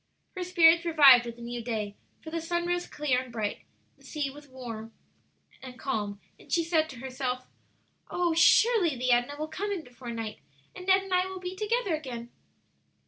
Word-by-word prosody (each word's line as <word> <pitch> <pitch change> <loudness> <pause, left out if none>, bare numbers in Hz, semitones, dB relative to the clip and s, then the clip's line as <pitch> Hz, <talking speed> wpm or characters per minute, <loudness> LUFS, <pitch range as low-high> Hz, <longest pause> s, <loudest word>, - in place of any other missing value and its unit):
Her 370 - -3
spirits 340 -2 +5
revived 280 -8 +7
with 235 - -6
the 235 - -11
new 240 0 -5
day, 215 -3 -3 0.3
for 315 - -8
the 330 0 -2
sun 345 +1 -1
rose 350 0 -1
clear 275 -4 0
and 255 -1 -11
bright, 215 -3 -3 0.4
the - - -22
sea 295 -3 -3
was 290 +1 -13 1.3
calm, 210 -7 -3 0.2
and - - -17
she 335 - +3
said 320 -1 +1
to - - -9
herself, 255 0 -4 0.6
"Oh, 350 -2 +1
surely 345 - +5
the 250 0 0
Edna 245 +4 +2
will 310 +1 -3
come 405 +6 -4
in 370 -5 -3
before 245 -1 -11
night, 225 -2 -5 0.4
and 365 - -9
Ned 380 0 +5
and 385 -1 -5
I 365 +1 +3
will 380 0 -7
be 365 0 -6
together 425 -1 0
again!" 245 -6 -5
300 Hz, 185 wpm, -28 LUFS, 245-350 Hz, 1.3 s, revived